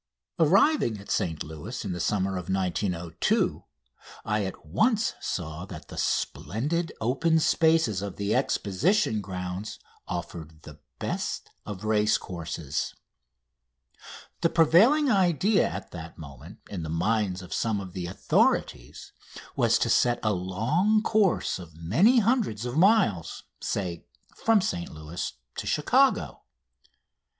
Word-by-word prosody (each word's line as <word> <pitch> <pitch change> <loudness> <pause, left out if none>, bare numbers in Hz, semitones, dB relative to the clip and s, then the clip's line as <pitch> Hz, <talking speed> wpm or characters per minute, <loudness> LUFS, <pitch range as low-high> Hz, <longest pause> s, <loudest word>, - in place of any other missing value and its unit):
Arriving 185 - +4
at 100 - -9
St 80 -4 -1
Louis 80 -1 -7
in - - -3
the 90 - -4
summer 95 +1 0
of 90 -1 -5
1902, 90 -2 0 0.6
I 105 -1 0
at 95 -3 -7
once 220 - +1
saw 80 -1 -4
that 85 -4 -10
the - - -9
splendid 155 - -1
open 150 +8 +2
spaces 160 - +2
of 100 -2 -5
the 100 +1 -1
Exposition 120 - +1
Grounds 90 +1 -5 0.3
offered 80 -3 -6
the 75 0 -12 0.2
best - - -4 0.2
of 105 -1 -6
racecourses. 90 -8 -1 1.5
The 165 - +3
prevailing 215 - +5
idea 190 - +3
at - - -7
that 85 -1 -9
moment 70 -6 -11
in 95 -4 -5
the 80 - -5
minds 95 +2 0
of 90 - -8
some 110 -3 0
of 95 -2 -8
the 90 -2 -4
authorities 60 -8 0 0.4
was - - +3
to - - 0
set 120 -1 +3
a 110 -1 +2
long 125 - +1
course 210 - +1
of 85 -3 -11
many 135 - +4
hundreds 220 - +1
of 120 +1 -4
miles 180 - +2 0.2
say, 90 -4 -3 0.3
from 225 -2 +3
St 85 - -3
Louis 80 +3 -6 0.2
to - - -4
Chicago. - - +2
100 Hz, 125 wpm, -27 LUFS, -, 1.5 s, prevailing